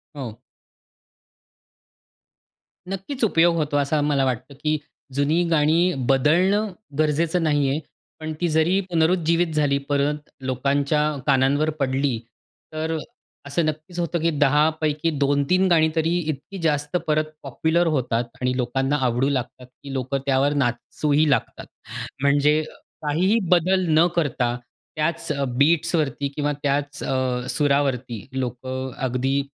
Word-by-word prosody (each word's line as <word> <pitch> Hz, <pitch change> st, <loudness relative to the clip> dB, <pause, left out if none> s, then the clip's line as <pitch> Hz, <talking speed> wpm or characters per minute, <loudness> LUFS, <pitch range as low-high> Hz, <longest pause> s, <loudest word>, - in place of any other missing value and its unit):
हो. 120 Hz, -5 st, -7 dB, 2.5 s
नक्कीच. 195 Hz, +8 st, -5 dB
उपयोग 170 Hz, -5 st, +4 dB
होतो 150 Hz, -3 st, 0 dB
असं 145 Hz, +2 st, +1 dB
मला 140 Hz, -2 st, +2 dB
वाटतं, 130 Hz, +2 st, -3 dB
की 155 Hz, 0 st, +2 dB, 0.4 s
जुनी 150 Hz, +5 st, +2 dB
गाणी 165 Hz, +3 st, +3 dB, 0.2 s
बदलणं 180 Hz, +10 st, +3 dB, 0.3 s
गरजेचं 160 Hz, +3 st, +1 dB
नाही 145 Hz, -3 st, +2 dB
आहे. 140 Hz, +3 st, 0 dB, 0.4 s
पण 155 Hz, 0 st, -4 dB
ती 175 Hz, -, +2 dB
जरी 160 Hz, +5 st, +2 dB
पुनरुज्जीवित 165 Hz, 0 st, +2 dB
झाली, 145 Hz, -2 st, +2 dB
परत 145 Hz, +1 st, 0 dB, 0.2 s
लोकांच्या 140 Hz, +3 st, +1 dB, 0.3 s
कानांवर 140 Hz, +3 st, +3 dB
पडली, 135 Hz, -2 st, 0 dB, 0.5 s
तर 160 Hz, +1 st, -2 dB, 0.5 s
असं 150 Hz, +3 st, 0 dB
नक्कीच 155 Hz, +3 st, -4 dB
होतं, 170 Hz, 0 st, -1 dB
की 165 Hz, -, +2 dB
10 150 Hz, +2 st, +4 dB
पैकी 155 Hz, +1 st, 0 dB
2-3 145 Hz, +7 st, +2 dB
गाणी 160 Hz, -3 st, +4 dB
तरी 165 Hz, +2 st, +1 dB
इतकी 155 Hz, +3 st, -5 dB
जास्त 150 Hz, 0 st, 0 dB
परत 155 Hz, 0 st, +1 dB
पॉप्युलर 160 Hz, +6 st, +1 dB
होतात 120 Hz, -2 st, 0 dB, 0.2 s
आणि 125 Hz, 0 st, 0 dB
लोकांना 135 Hz, +3 st, 0 dB
आवडू 125 Hz, +3 st, +1 dB
लागतात, 130 Hz, -1 st, -3 dB
की 135 Hz, +2 st, -11 dB
लोकं 130 Hz, +1 st, -1 dB
त्यावर 140 Hz, +1 st, +2 dB
नाचूही 145 Hz, +3 st, +1 dB
लागतात. 140 Hz, -, -1 dB, 0.6 s
म्हणजे 145 Hz, +2 st, +3 dB, 0.4 s
काहीही 180 Hz, +9 st, +2 dB
बदल 185 Hz, +2 st, +3 dB
न 165 Hz, -, +6 dB
करता 125 Hz, -7 st, 0 dB, 0.4 s
त्याच 155 Hz, +1 st, -1 dB
अ, 140 Hz, -2 st, -1 dB
बीट्सवरती 150 Hz, -1 st, +2 dB
किंवा 145 Hz, 0 st, 0 dB
त्याच 145 Hz, 0 st, -1 dB
अ, 130 Hz, -1 st, -1 dB
सुरावरती 135 Hz, -6 st, 0 dB
लोकं 130 Hz, +1 st, -4 dB, 0.2 s
अगदी 130 Hz, +3 st, 0 dB
145 Hz, 125 wpm, -23 LUFS, 135-160 Hz, 2.5 s, न